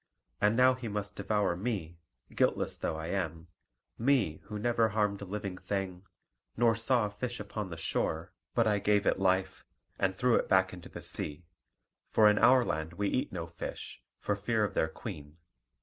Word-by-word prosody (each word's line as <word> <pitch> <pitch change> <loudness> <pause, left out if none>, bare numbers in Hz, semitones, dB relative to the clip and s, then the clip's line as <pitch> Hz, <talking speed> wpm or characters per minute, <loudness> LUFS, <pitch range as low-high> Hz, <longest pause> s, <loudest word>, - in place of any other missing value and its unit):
And 105 +2 +4
now 130 +1 +6
he 125 -2 -6
must 105 -1 -4
devour 100 -3 0
me, 90 -5 -3 0.3
guiltless - - +1
though 80 - -2
I 80 +1 -5
am 85 -3 -3 0.5
me 115 - +2
who 105 0 -5
never 115 0 +2
harmed 105 -1 0
a - - -5
living 100 -1 -5
thing, 95 -2 -3 0.5
nor 115 -1 +4
saw 115 0 +2
a 105 - -4
fish 120 +3 -4
upon 105 0 -4
the 80 - -6
shore 80 +1 -2 0.2
but 115 - +4
I 105 -2 +2
gave 105 0 +2
it - - +2
life, 95 0 +1 0.4
and 95 -1 +1
threw 125 -1 +2
it - - -1
back 95 -1 +4
into 90 -2 -10
the - - -8
sea; 75 +3 -4 0.6
for 110 - +5
in 105 0 +4
our 125 +1 +6
land 80 +2 -2
we 100 +3 -1
eat 130 +3 -1
no 85 -3 -4
fish, 85 0 -7 0.2
for 105 - -1
fear 110 +2 0
of 105 -1 -1
their 80 - +2
queen. 80 -5 -8
100 Hz, 185 wpm, -31 LUFS, 90-110 Hz, 0.6 s, now